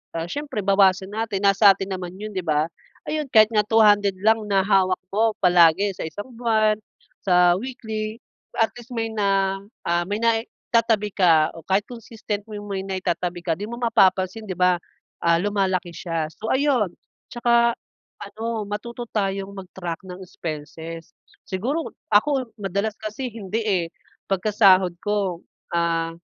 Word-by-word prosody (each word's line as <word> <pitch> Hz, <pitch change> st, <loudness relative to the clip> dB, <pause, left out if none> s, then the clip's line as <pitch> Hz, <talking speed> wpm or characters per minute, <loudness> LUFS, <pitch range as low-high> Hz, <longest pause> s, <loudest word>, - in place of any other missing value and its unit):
ah, 165 Hz, 0 st, -2 dB
siyempre, 285 Hz, -2 st, -4 dB
bawasan 195 Hz, -1 st, +3 dB
natin. 220 Hz, -3 st, -2 dB
Nasa 195 Hz, 0 st, +7 dB
atin 195 Hz, 0 st, -6 dB
naman 180 Hz, -1 st, -7 dB
'yun, 215 Hz, +1 st, -6 dB
'di 185 Hz, -2 st, -3 dB
ba? 155 Hz, +1 st, +1 dB, 0.4 s
Ayun, 305 Hz, 0 st, -1 dB
kahit 215 Hz, -1 st, +7 dB
nga 210 Hz, -1 st, +3 dB
200 205 Hz, -2 st, +4 dB
lang 220 Hz, +1 st, +3 dB
na 195 Hz, -1 st, +3 dB
hawak 190 Hz, -2 st, +2 dB
ko 220 Hz, +1 st, +2 dB
palagi 180 Hz, +2 st, +5 dB
sa -, -, -4 dB
isang 205 Hz, +9 st, -7 dB
buwan, 220 Hz, -3 st, +2 dB, 0.5 s
sa 180 Hz, -1 st, +5 dB
weekly, 220 Hz, -2 st, -5 dB, 0.4 s
at 225 Hz, -1 st, +3 dB
least 240 Hz, +1 st, -11 dB
may 225 Hz, -1 st, -2 dB
na, 195 Hz, -2 st, +1 dB, 0.3 s
ah, 175 Hz, 0 st, +2 dB
may 205 Hz, -, 0 dB
naitatabi 230 Hz, -1 st, +1 dB
ka 165 Hz, -5 st, +4 dB
o 165 Hz, -, -9 dB
kahit 195 Hz, +2 st, +2 dB
consistent 225 Hz, -3 st, -6 dB
mo 210 Hz, -, -7 dB
yung 205 Hz, 0 st, -9 dB
may 190 Hz, -1 st, -2 dB
naitatabi 180 Hz, -2 st, -2 dB
ka, 165 Hz, -, +2 dB
di 205 Hz, -, -5 dB
mo 235 Hz, -, -6 dB
mapapansin, 215 Hz, -3 st, +2 dB
'di 185 Hz, -, -3 dB
ba, 180 Hz, -1 st, +3 dB, 0.4 s
ah, 170 Hz, 0 st, +4 dB
lumalaki 190 Hz, -3 st, 0 dB
siya. 165 Hz, -3 st, -2 dB
So, 220 Hz, -, -6 dB
ayun. 260 Hz, -9 st, +2 dB, 0.4 s
Tsaka 235 Hz, -1 st, +3 dB, 0.4 s
a -, -, -9 dB
ano, 225 Hz, 0 st, -3 dB
matuto 235 Hz, +3 st, -5 dB
tayong 195 Hz, -1 st, -2 dB
mag-track 180 Hz, -3 st, -6 dB
ng 180 Hz, 0 st, -8 dB
expenses. 165 Hz, 0 st, -7 dB, 0.3 s
Siguro 260 Hz, -, -2 dB, 0.2 s
ako, 260 Hz, +4 st, +3 dB
madalas 200 Hz, +2 st, -2 dB
kasi 220 Hz, +4 st, -5 dB
hindi, 220 Hz, 0 st, -3 dB
eh. 185 Hz, -5 st, +1 dB, 0.4 s
Pagka 195 Hz, +2 st, 0 dB
sahod 185 Hz, -4 st, +5 dB
ko, 200 Hz, -5 st, -1 dB, 0.3 s
ah, 165 Hz, -1 st, 0 dB
200 Hz, 155 wpm, -23 LUFS, 180-220 Hz, 0.5 s, Nasa